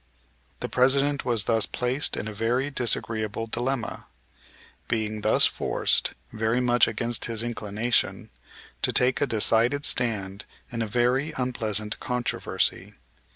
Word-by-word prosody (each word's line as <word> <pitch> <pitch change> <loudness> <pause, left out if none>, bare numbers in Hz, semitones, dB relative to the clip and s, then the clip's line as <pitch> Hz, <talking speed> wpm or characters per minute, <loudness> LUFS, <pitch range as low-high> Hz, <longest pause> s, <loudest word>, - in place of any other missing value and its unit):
The - - -1
President 135 +2 +2
was 115 -4 +4
thus 115 0 +1
placed 125 +4 0
in 105 - -4
a 110 - -6
very 120 +6 -1
disagreeable 115 -4 -1
dilemma, 120 +2 -3 0.8
being 110 -2 -2
thus - - +4
forced, - - +1 0.2
very 110 +2 0
much 120 -1 +3
against 115 +1 0
his 115 -1 0
inclination, 115 0 -1 0.5
to - - +2
take 125 +2 +3
a 145 - +2
decided 115 +5 +2
stand 100 -5 -1 0.3
in 115 -1 -3
a 115 - -1
very 125 +7 0
unpleasant 110 -4 -1
controversy. 125 -1 -2
120 Hz, 125 wpm, -25 LUFS, 110-125 Hz, 0.8 s, was